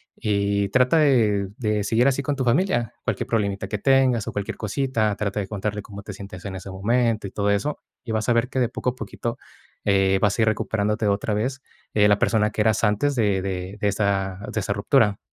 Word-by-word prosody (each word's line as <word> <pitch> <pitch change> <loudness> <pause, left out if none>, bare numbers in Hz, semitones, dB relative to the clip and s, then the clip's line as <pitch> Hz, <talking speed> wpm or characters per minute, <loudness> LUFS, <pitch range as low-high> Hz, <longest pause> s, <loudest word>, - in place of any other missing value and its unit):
Y 100 -1 0
trata 125 +8 +3
de 110 -9 +3
de 105 -3 0
seguir 115 +5 +2
así 140 0 +1
con 145 -1 -1
tu 135 - -1
familia, 120 - +1
cualquier - - -2
problemita 100 -3 -1
que 110 - -3
tengas, 130 -3 +3
o - - -2
cualquier 100 -1 -4
cosita, 110 -1 0
trata 105 0 -2
de 95 - -5
contarle 105 0 -3
cómo 100 -1 -9
te 100 - -7
sientes 95 -2 -9
en 95 -1 -5
ese 95 +1 -7
momento 115 +2 0
y - - -10
todo 100 0 0
eso. 110 +9 0 0.3
Y 115 - -4
vas 110 -1 -1
a - - +5
ver 115 +1 +1
que 130 - -2
de 120 -3 +2
poco 125 - -2
a - - -15
poquito, 115 +1 -5 0.5
eh, 95 -1 +3
vas 105 0 +1
a - - +5
ir - - +1
recuperándote 105 0 -1
otra 100 +1 0
vez, 130 +5 -2 0.3
eh, 105 -1 +5
la 105 -1 +4
persona 110 -2 +2
que 105 - -1
eras 110 +1 +2
antes 105 +7 +2
de 105 -5 +1
de 95 +1 -4
de 105 - +2
esa 95 -2 -1
de 110 - -1
esa 100 - -1
ruptura. 105 0 +2
105 Hz, 225 wpm, -23 LUFS, 100-120 Hz, 0.5 s, a